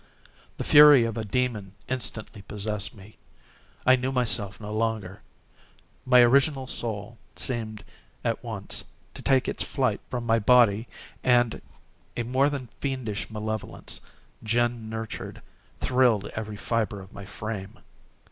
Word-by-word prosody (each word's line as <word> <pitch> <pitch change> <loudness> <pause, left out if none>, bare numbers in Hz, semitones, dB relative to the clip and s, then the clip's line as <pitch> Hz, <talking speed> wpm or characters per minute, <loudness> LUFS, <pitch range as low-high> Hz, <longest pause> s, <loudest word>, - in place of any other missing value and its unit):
The - - -3
fury 145 -4 +8
of 115 -1 -2
a 115 - -2
demon 105 -3 -2
instantly 115 -4 -3
possessed 105 0 -3
me. 105 +1 -15 0.7
I 130 - +7
knew 130 +1 -2
myself 115 -6 0
no 105 -1 -6
longer. 110 -3 -2 0.9
My 125 -1 +7
original 135 +2 +4
soul 115 -3 -3 0.2
seemed, 110 -4 -2 0.4
at - - -1
once, - - -2 0.3
to - - -7
take 135 -2 +2
its - - -2
flight - - 0
from 120 -2 -3
my 115 0 +3
body 115 -1 +4 0.4
and 120 -2 +3 0.6
a 120 - 0
more 130 +4 +2
than 140 -3 -4
fiendish 130 -7 -3
malevolence, 110 -1 -4 0.4
gin 120 0 0
nurtured, 110 0 -6 0.4
thrilled 125 -5 +3
every 105 -1 -5
fibre 110 -2 -1
of 95 0 -13
my 100 - -9
frame. 105 -1 -6
115 Hz, 130 wpm, -26 LUFS, 105-125 Hz, 0.9 s, fury